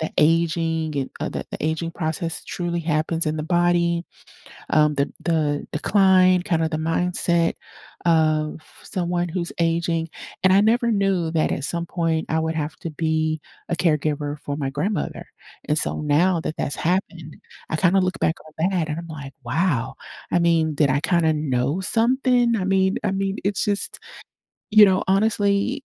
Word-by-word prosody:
the 160 - -2
aging 160 0 +1
and, 135 -2 -2
uh, - - -1
the - - -5
the - - -4
aging 160 +2 -1
process 165 -1 -3
truly 175 -1 -3
happens 160 +1 0
in 155 0 -1
the 155 - -3
body, 175 0 +1 0.7
um, 150 0 +3
the 140 0 0
the 155 -4 0
decline, 185 +1 +4
kinda 165 -3 0
the 155 - -2
mindset 170 +1 +1 0.5
of 155 -2 +2 0.2
someone 175 -2 -2
who's 170 0 -3
aging. 165 0 0 0.4
And 185 0 +5
I 195 - +6
never 235 +2 +2
knew 195 -5 +1
that 160 -1 +1
at 140 - -2
some 170 +2 -2
point 165 -2 -1
I 160 - +1
would 160 0 -2
have 155 0 -3
to 165 - -6
be 155 0 -1 0.3
a 175 - 0
caregiver 150 -3 0
for 145 -1 -5
my 140 -3 -2
grandmother, 150 +6 -3 0.4
and 150 - +2
so - - +1
now 165 +5 +2
that 160 - -4
that's 140 - -2
happened, 175 -3 -2 0.3
I - - -1
kinda 185 +3 +3
look 185 0 -1
back 160 - +1
on 160 +3 -2
that, 175 -4 0
and 150 - -3
I'm 170 - -8
like, 140 -4 -8
"Wow." 145 0 0 0.4
I 175 - +3
mean, 165 -2 +2
did 145 -1 +3
I 130 +2 +2
kinda 165 -2 +2
know 145 +2 -1
something? 240 +3 +2
I 195 - -2
mean 190 0 +2
I 205 - 0
mean, 195 +1 -2
it's 200 0 +1
just 205 -1 -2 0.7
you 215 0 +8
know, 190 -2 +3
honestly 205 +5 +1
165 Hz, 170 wpm, -22 LUFS, 155-185 Hz, 0.7 s, you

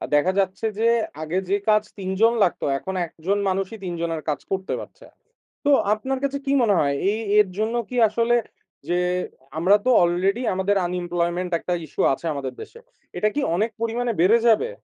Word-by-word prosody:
দেখা 175 +6 +3
যাচ্ছে 190 +3 -1
যে 230 - +1 0.4
আগে 160 +4 -2
যে 200 - +3
কাজ 210 0 +4 0.2
তিনজন 195 +5 +2
লাগতো, 175 - 0
এখন 190 +6 -5
একজন 185 +6 -2
মানুষই 195 +3 -2
৩ 175 - -3
জনের 165 -2 -2
কাজ 145 - -1
করতে 190 0 -2
পারছে। - - -12 0.6
তো - - +3 0.2
আপনার 260 +5 -3
কাছে 280 0 0
কি 275 - 0
মনে 215 -4 +3
হয় 140 -1 +1 0.2
এই 220 - -2 0.2
এর 210 - +5
জন্য 225 +2 0
কি 250 - -4
আসলে 230 +2 +1 0.5
যে 175 - +2 0.6
আমরা 185 +5 +5
তো - - +3
already 190 +7 +1
আমাদের 190 +2 +1
unemployment 175 0 -2
একটা 180 - -3
issue - - -1
আছে 170 - -7
আমাদের 135 -2 -4
দেশে, 465 - -11 0.4
এটা 215 - +2
কি 295 - +1
অনেক 215 +5 +1
পরিমাণে 235 +1 -1
বেড়ে 220 +6 +5
যাবে? 230 - +3
195 Hz, 180 wpm, -23 LUFS, 175-230 Hz, 0.6 s, এর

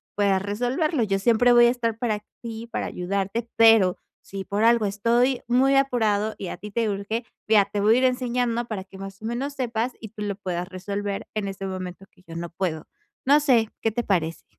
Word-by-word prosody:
puedas 200 -2 +2
resolverlo. 245 - 0
Yo 195 -2 0
siempre 235 +4 +4
voy 240 0 +7
a - - +6
estar 230 -3 -2
para 215 -3 -2 0.2
ti, 230 -1 -6
para - - -2
ayudarte, 200 +5 -3
pero, 225 -5 +6 0.2
si 195 0 -7
por 205 +3 -1
algo 230 -1 +4
estoy 235 +6 +1
muy 260 +3 +3
apurado 220 -6 +1
y 190 - -6
a - - -6
ti 210 - -9
te 225 +1 0
urge, 205 +4 -3 0.2
vea, 210 -2 +5
te 205 +1 -4
voy 215 +3 +4
a - - +3
ir - - 0
enseñando 245 -2 0
para 215 -5 -5
que, 190 0 -14
más 195 +1 -9
o - - -8
menos, 250 +5 -3
sepas, 245 -2 -2
y 220 - -8
tú 215 0 -10
lo 200 -1 -2
puedas 180 -3 -4
resolver 200 +2 -4
en 215 -2 -2
ese 195 0 -5
momento 185 0 -6
que 180 - -25
yo 165 0 -10
no 170 0 -5
puedo". 170 -3 -3 0.4
No 285 +3 +6
sé, 240 -7 +3
¿qué 225 - +1
te 240 +2 -2
parece? 165 -6 -1
215 Hz, 215 wpm, -24 LUFS, 195-240 Hz, 0.4 s, voy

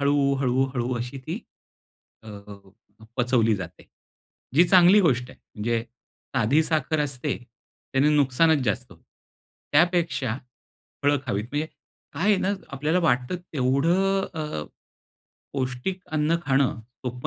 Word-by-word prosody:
हळू, 140 -1 +2
हळू, 130 0 +2
हळू 120 0 -1
अशी 125 +3 -5
ती, - - -4 0.8
अ, 110 - -12 0.9
पचवली 120 -3 +3
जाते. 90 -1 -9 0.7
जी 170 +5 +7
चांगली 185 +2 +7
गोष्ट 130 -8 +1
आहे. - - -16 0.2
म्हणजे 115 +2 -1 0.5
साधी 130 +6 +3
साखर 155 -1 0
असते. 140 -1 -2 0.6
त्याने 135 +2 +3
नुकसानच 145 +2 +3
जास्त. 105 -4 -2 0.8
त्यापेक्षा 165 -7 +2 0.7
फळं 145 0 +3
खावीत 105 -3 -1
म्हणजे 150 +2 -1 0.5
काय 165 - -4
आहे 205 - +5
ना, 190 - +1 0.2
आपल्याला 150 +6 0
वाटतं 125 0 +1 0.2
तेवढं 165 +9 +2
अ, 150 - -4 0.9
पौष्टिक 130 +8 -3
अन्न 155 +2 +2
खाणं 135 -3 +1
सोप्प 125 +2 -7
140 Hz, 120 wpm, -25 LUFS, 125-160 Hz, 0.9 s, जी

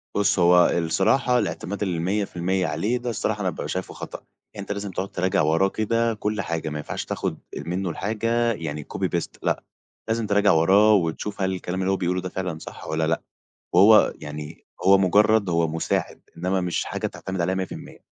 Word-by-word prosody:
بُص، 100 -1 +2
هو 90 0 +6
الصراحة 125 +10 +2
الإعتماد 100 -1 -3
ال100% 95 0 -1
عليه 115 +9 0
ده 120 0 -4
الصراحة 110 -1 -2
أنا 95 - +1
بابقى - - -5
شايفه 95 0 -4
خطأ. - - -7 0.4
أنت 100 0 -6
لازم 100 -1 -4
تقعد 95 +2 -3
تراجع 95 +2 +1
وراه 80 +6 +3
كده 115 +2 0
كل 105 -1 -2
حاجة، 80 -3 -3
ما 75 - -4
ينفعش 75 - -5
تاخد - - -3 0.3
منه 90 +2 -2
الحاجة 115 +6 0
يعني 75 -5 -5
copy - - 0
paste - - -4
لأ، - - 0 0.4
لازم 115 0 0
تراجع 100 0 +4
وراه 100 +7 +5
وتشوف 100 +3 -1
هل 95 0 +1
الكلام 90 0 -4
اللي 95 - +1
هو 95 - +1
بيقوله 90 0 -1
ده 90 - -5
فعلًا 90 -3 -4
صح - - -10
والّا 80 0 0
لأ، 80 - 0 0.5
وهو 105 +4 +7
يعني 75 +1 -8 0.2
هو 95 0 +7
مجرد 105 +2 +4
هو 85 -1 +2
مساعد، 80 +1 -2
إنما 90 +2 0
مش 90 -1 -1
حاجة - - -3
تعتمد 95 -1 -5
عليها 90 +2 +1
100%. 95 -1 -6
95 Hz, 180 wpm, -24 LUFS, 85-105 Hz, 0.5 s, وهو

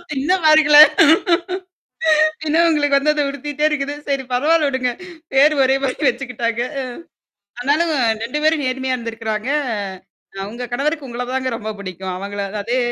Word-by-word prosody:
இன்னும் 335 +7 0
மறக்கல. 310 -1 +6 1.7
இன்னும் 330 +3 +3
உங்களுக்கு 290 -3 +2
வந்து 300 +2 +2
அத 295 - 0
உருத்திட்டே 290 +2 -4
இருக்குது. 290 -1 -2
சரி 275 -1 -1
பரவால்ல 300 +5 +2
விடுங்க. 260 -2 -1 0.4
பேரு 290 +3 +5
ஒரே 265 +1 +3
மாரி 270 +2 0
வச்சுக்கிட்டாங்க. 240 -2 -2 0.2
அ. - - -2 0.8
ஆனாலும் 305 +6 +1 0.3
2 250 +6 -3
பேரும் 310 -2 +2
நேர்மையா 260 0 -1
இருந்திருக்கறாங்க. 225 0 -4 1.0
உங்க 240 +3 -6
கணவருக்கு 290 +3 -2
உங்கள 245 +1 -4
தாங்க 260 0 -1
ரொம்ப 220 -1 -6
பிடிக்கும். 185 -1 -6
அவங்கள 200 +2 -5 0.2
அதே 240 +5 -1
265 Hz, 135 wpm, -19 LUFS, 240-295 Hz, 1.7 s, மறக்கல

